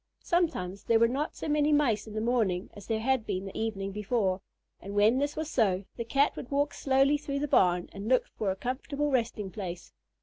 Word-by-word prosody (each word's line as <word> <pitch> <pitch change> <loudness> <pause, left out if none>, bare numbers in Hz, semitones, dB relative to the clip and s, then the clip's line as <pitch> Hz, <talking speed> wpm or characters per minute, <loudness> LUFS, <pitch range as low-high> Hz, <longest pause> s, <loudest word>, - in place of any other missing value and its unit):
Sometimes 200 - 0
there 230 - +4
were 230 +1 +5
not 275 +6 -2
so - - -5
many 300 0 +2
Mice 245 -8 +2
in 215 - -9
the 215 - -1
morning 215 -6 0
as 205 -2 -12
there 220 -1 -1
had 260 0 +1
been 195 -2 -3
the 195 - -8
evening 200 -3 -2
before, 200 -2 0 0.4
and 200 +1 -8
when 215 +5 +4
this 285 +1 -1
was 315 0 -3
so, 200 -9 +1
the 235 - -3
Cat 275 +5 +2
would 250 - -7
walk 285 +1 +1
slowly 275 +2 +3
through 285 -1 -3
the 290 +1 -1
barn 180 -8 +3
and 200 +1 -6
look 255 -1 +4
for 210 - -1
a 190 - 0
comfortable 280 +6 -2
resting 225 -6 -1
place. 180 - -7
225 Hz, 215 wpm, -29 LUFS, 195-280 Hz, 0.4 s, were